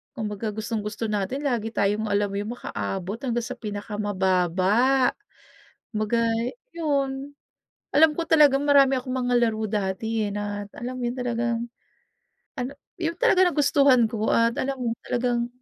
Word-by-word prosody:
kumbaga 215 -1 -4
gustong-gusto 215 0 -3
natin 210 +8 -2
lagi 240 -6 0
tayong, 210 0 0
alam 205 -1 +1
mo - - -5
yun, 205 +2 -4
makaabot 195 -1 -4
hanggang 240 -3 -1
sa - - -5
pinakamababa. 205 +3 +1 0.8
Kumbaga 215 +1 0 0.6
yun, 280 -2 -1 0.6
alam 300 +1 +5
ko 335 - -1
talagang 290 -3 +5
marami 275 -2 +5
akong 255 0 -4
mga 245 -1 0
laro 220 -1 -2
dati 210 +2 -1
eh, 205 - -3
na 205 0 -4
alam 250 +2 -6
mo 245 - -3
yun, 240 - -1
talagang 235 -1 -2 0.9
ano, 250 +2 -3 0.3
yun 335 0 -1
talaga 375 -6 +4
nagustuhan 280 -7 +4
ko 220 -1 -2
at 230 +1 +2
alam 270 +1 -1
mo, 245 -3 -2 0.2
talagang 240 -1 0
235 Hz, 140 wpm, -25 LUFS, 210-270 Hz, 0.9 s, alam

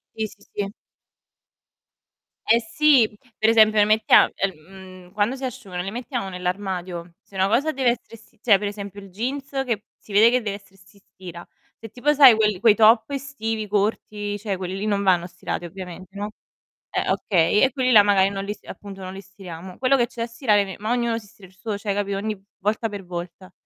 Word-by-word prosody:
Sì, 220 -1 -2
sì, 200 - -19
sì. 200 -1 -3 1.8
Eh 230 +1 +5
sì, 240 -2 +3 0.2
per 220 - +2
esempio 215 -1 +5
le 205 - +6
mettia 215 +1 +5
el 195 0 0
mhmm, 185 +2 -14
quando 215 +5 0
si 265 - -7
asciugano, 190 -8 -5
le 190 - -4
mettiamo 240 -2 -4
nell'armadio? 180 -2 -4
Se - - -24
una 190 0 +3
cosa 270 +9 +2
deve 260 -2 +2
essere 235 -1 -5
essi 225 0 -23
cioè 205 -5 +5
per 205 - -4
esempio 200 -1 -8
il 195 -1 -13
jeans 265 +8 -4
che 230 -5 -2
si 210 - -14
vede 215 +3 +6
che 250 0 +1
dev'essere 200 -2 -7
st 185 -1 -22
si 200 - -21
stira. 180 -3 -12 0.3
Se 225 - -10
tipo 250 +6 +1
sai 275 -5 +8
quel 210 -3 +1
quei 220 -2 +6
top 225 +2 +5
estivi 255 -6 -4
corti, 205 0 -1
cioè, 205 -2 -3
quelli 185 +1 -5
lì 205 - -3
non 200 -1 0
vanno 175 -2 +3
stirati 175 0 -5
ovviamente, 185 +1 -9
no. 205 +1 -4 0.6
Eh - - -1
okay, 185 +1 +2
e 265 - +4
quelli 255 -1 +1
là 210 -3 +9
magari 195 -1 +3
non 195 0 -4
li 205 - -3
s - - -22
appunto 200 -1 -10
non 185 0 -6
li 190 - -8
stiriamo. 185 -2 -11
Quello 260 +1 +3
che 240 -2 +2
c'è 235 - -7
da - - -1
stirare 230 -4 +2
me 190 -1 -8
ma 215 +2 -4
ognuno 235 -2 0
si 220 - -13
stira 195 -1 -16
il 185 - -24
suo, 210 +2 -4
cioè 205 -1 -2
capito, 200 -1 -2
ogni 215 +2 -2
v 195 - -21 0.2
volta 220 +2 -1
per 205 -2 -7
volta. 175 +1 -8
205 Hz, 215 wpm, -23 LUFS, 190-225 Hz, 1.8 s, là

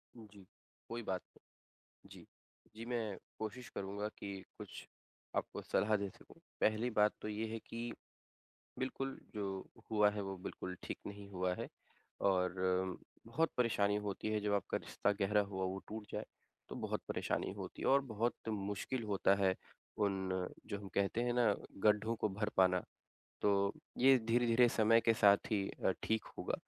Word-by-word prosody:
उ, 115 -2 -10
जी, 100 -2 -14 0.4
कोई 120 +1 -3
बात 95 -3 -1
नहीं। - - -29 0.5
जी, - - -12 0.5
जी 115 - -6
मैं 115 -5 -1 0.2
कोशिश 115 +3 -5
करूँगा 100 +2 -2
कि 100 -1 -4 0.2
कुछ - - -8 0.5
आपको - - -2
सलाह 105 +1 +2
दे 100 -1 -2
सकूँ। - - -17 0.2
पहली 110 +3 +3
बात 105 -2 +4
तो - - -3
ये 110 +1 -2
है 115 - -2
कि, 115 +1 -5 0.9
बिल्कुल 135 +1 -2 0.2
जो 105 - -2 0.5
हुआ 105 -1 +5
है 105 - -3
वो 95 0 -4
बिल्कुल 90 -1 -5
ठीक - - -4
नहीं 100 0 -7
हुआ 90 -1 0
है, - - -4 0.5
और 90 -2 +3 0.7
बहुत 160 +8 +1
परेशानी 105 -4 +3
होती 100 +1 -2
है 105 - +1
जब 105 0 0
आपका 100 - 0
रिश्ता 105 - 0
गहरा 105 +1 +4
हुआ 95 -1 -1
वो 95 +1 -2
टूट 110 -1 -6
जाए। - - -2 0.4
तो - - -6
बहुत - - -2
परेशानी - - 0
होती - - -6
है - - +2
और 140 +1 +6
बहुत 115 -1 0 0.2
मुश्किल 105 +4 -2
होता 100 -1 +3
है 95 -2 +3 0.4
उन 95 -3 0 0.2
जो 100 - -3
हम 100 -1 -8
कहते 100 +3 +2
हैं 120 - +1
ना 115 -4 +4 0.3
गड्ढों 105 +2 +4
को 110 - +1
भर 105 +2 -1
पाना। 90 -1 +5 0.6
तो 105 - +5 0.5
ये 130 +2 +8
धीरे-धीरे 120 +1 +4
समय 115 0 +5
के 115 0 +4
साथ 100 -2 +7
ही 100 -3 +1 0.2
अ, - - +5
ठीक 110 0 +1
होगा। - - -1
105 Hz, 170 wpm, -37 LUFS, 100-115 Hz, 0.9 s, ये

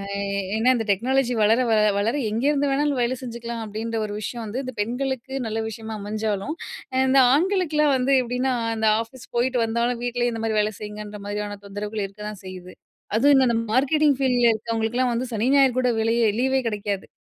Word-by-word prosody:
அ - - -3 0.4
ஏன்னா, 240 +3 +3
இந்த 225 - -2
டெக்னாலஜி 250 +4 +1
வளர 225 +4 +4
வ - - +5 0.2
வளர 225 +5 0 0.2
எங்கேருந்து 280 +6 +1
வேணாலும் 285 -1 +1
வேலை 245 +2 +1
செஞ்சுக்கலாம் 235 -1 -6
அப்படின்ற 220 +2 -4
ஒரு 210 - -5
விஷயம் 235 +3 -5
வந்து 220 +5 -4
இந்த 255 -1 -6
பெண்களுக்கு 260 +3 -3
நல்ல 220 0 -2
விஷயமா 220 0 -7
அமைஞ்சாலும், 215 +5 -2 0.4
அ - - 0
இந்த 270 +1 +4 0.2
ஆண்களுக்கெலாம் 315 -4 +2
வந்து 260 +2 +1
எப்படின்னா 250 +2 -1 0.2
அந்த 220 0 0 0.2
ஆஃபீஸ் 235 +2 -13
போயிட்டு 245 +1 +1
வந்தாலும், 235 +1 -1
வீட்டிலேயே 245 0 0
இந்த 225 0 -4
மாரி 220 -1 0
வேலை 210 +1 0
செய்யுங்கன்ற 210 0 -7
மாதிரியான 205 0 -4
தொந்தரவுகள் 205 +1 -4
இருக்கதான் 210 0 -8
செய்யுது. 185 -1 -9 0.4
அதுவும் 270 +2 +5
இந்த 235 -2 +2 0.2
மார்க்கெட்டிங் 285 +3 +3
ஃபீல்டில 245 -3 +3
இருக்கிறவங்களுக்கெல்லாம், 230 +3 -1
வந்து 245 +2 -2
சனி 225 +4 0
ஞாயிறு 270 -3 +5
கூட 250 -1 +2
வேலையே 230 +1 +2
லீவே 265 0 +2
கிடைக்காது. 205 -2 -3
235 Hz, 175 wpm, -23 LUFS, 215-260 Hz, 0.4 s, வ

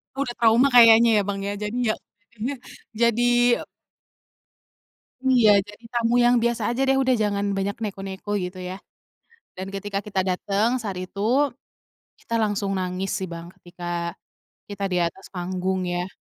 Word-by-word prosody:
Udah 270 -3 -2
trauma 235 +4 +5
kayaknya 230 -1 +8
ya, - - 0
Bang, 200 -1 -2
ya. 200 - -2
Jadi, 210 +3 -3
ya. - - -2 0.4
Jadinya, 235 +5 -4 0.4
jadi 235 +1 +2 2.0
Iya, 250 -5 +5 0.2
jadi 210 +3 -14
tamu 235 0 +1
yang 240 0 +5
biasa 235 0 0
aja 240 +2 -1
deh, 270 0 +3
udah 260 -1 +3
jangan 200 -1 0
banyak 195 +1 -1
neko-neko 195 -1 -6
gitu 180 +1 -6
ya, 180 +1 -5 0.8
dan 190 +1 -6
ketika 200 0 -4
kita 195 -2 -3
dateng 200 +4 0
saat 200 -4 -4
itu, 185 +2 -6 1.0
kita 230 - -4
langsung 205 -2 -1
nangis 185 +1 -2
sih, 190 - -3
Bang. 170 0 -7
Ketika 175 0 -11 0.9
kita 200 -1 -4
di 180 - +2
atas 170 +3 -4
panggung 185 +1 -2
ya, 175 0 -2
200 Hz, 150 wpm, -24 LUFS, 185-235 Hz, 2.0 s, kayaknya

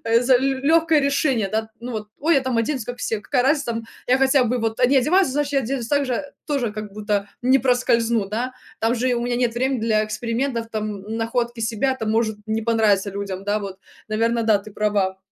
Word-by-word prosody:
э, 230 +1 +3
за 255 +1 +4
л 245 - +4
лёгкое 300 +4 +3
решение, 275 -6 +1
да. 220 +1 -2
Ну 245 +1 -6
вот: 215 -2 -5
"Ой, 320 +3 +2
я 275 - +4
там 255 -3 -1
оденусь 245 0 -1
как 245 +1 -6
все, 220 -3 -2
какая 250 +2 0
разница, 280 +2 +2
там 230 0 -4 0.2
я 255 +1 +3
хотя 265 -1 +4
бы 245 +2 0
вот 225 -1 -2
они 260 +2 +5
одеваются, 325 +2 +3
значит, 290 0 -1
я 275 - +4
оденусь 245 -1 -3
также, 280 -2 0 0.2
тоже, 265 -8 -1
как 215 -1 -6
будто 205 -1 -1
не 260 +2 +4
проскользну. 235 -3 +2
Да, 240 +5 -2 0.3
там 225 +2 +1
же 250 +2 0
и 245 - +2
у 235 - -2
меня 240 0 -1
нет 245 -2 0
времени 260 +1 0
для 215 -1 +2
экспериментов, 230 +2 -2
там, 215 -1 -3 0.2
м, 220 +1 -4
находки 235 +1 -2
себя 225 +4 0
там 220 -3 -2
может 220 -1 +1
не 220 +1 -1
понравиться 215 -3 +2
людям". 195 -1 -5
Да 205 +1 +1
вот, 195 -1 -7 0.3
наверно, 230 +2 +1
да 220 -2 +3
ты 210 +2 -11
права. 200 -3 0
235 Hz, 225 wpm, -22 LUFS, 215-260 Hz, 0.3 s, они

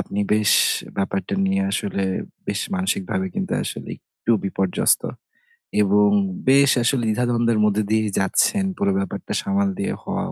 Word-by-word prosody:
আপনি 100 - -5
বেশ 105 -1 +3 0.4
ব্যাপারটা 95 - -2
নিয়ে 195 0 +1
আসলে, 100 - -2 0.4
বেশ 100 +1 -2
মানসিকভাবে 190 0 -1
কিন্তু 195 -2 -3
আসলে - - -6 0.2
একটু 115 - -5
বিপর্যস্ত 95 -1 +1 0.8
এবং 105 +1 +4 0.4
বেশ 140 0 +6
আসলে 120 0 +1
দ্বিধা-দ্বন্দ্বের 115 0 +1
মধ্যে 105 0 +1
দিয়েই 110 -1 +1
যাচ্ছেন। 195 - +2
পুরো 100 0 +1
ব্যাপারটা 100 0 -4
সামাল 200 -1 0
দিয়ে 200 - -1
হওয়াও - - -3
110 Hz, 135 wpm, -22 LUFS, -, 0.8 s, বেশ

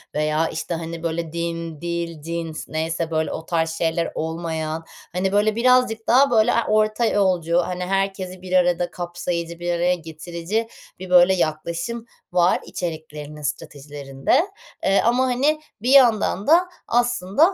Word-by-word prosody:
veya, 155 +1 +1
işte, 160 +2 -4
hani, 165 0 -6
böyle, 165 -1 -3
din, 165 -2 -4
dil, 170 -2 -3
cins 165 0 -5
neyse, 160 +1 -2
böyle, 160 0 0
o 160 - -6
tarz 165 -1 0
şeyler 165 +1 -1
olmayan, 160 -1 -3 0.3
hani, 190 +2 0
böyle, 210 +1 +2
birazcık 240 -2 +3
daha, 265 +2 +5
böyle, 225 +1 +4
a 235 - +1
orta 215 +2 +2
yolcu, 180 -6 +2
hani, 180 0 -3
herkesi 190 -1 -2
bir 185 0 -7
arada 175 -1 +2
kapsayıcı, 175 -1 -4
bir 175 0 -2
araya 175 +1 +2
getirici 170 +6 -4 0.3
bir, 185 -1 -8
böyle, 180 +1 +6
yaklaşım 170 +7 -2 0.3
var 175 0 +3
içeriklerinin 155 -3 -6
stratejilerinde. 145 - -1 0.4
Eee, 195 +1 +3
ama, 245 +3 +3
hani, 280 +5 +1 0.2
bir 245 - -1
yandan 230 -7 +4
da 345 +4 +5 0.2
aslında 240 -4 0
175 Hz, 145 wpm, -22 LUFS, 165-210 Hz, 0.4 s, böyle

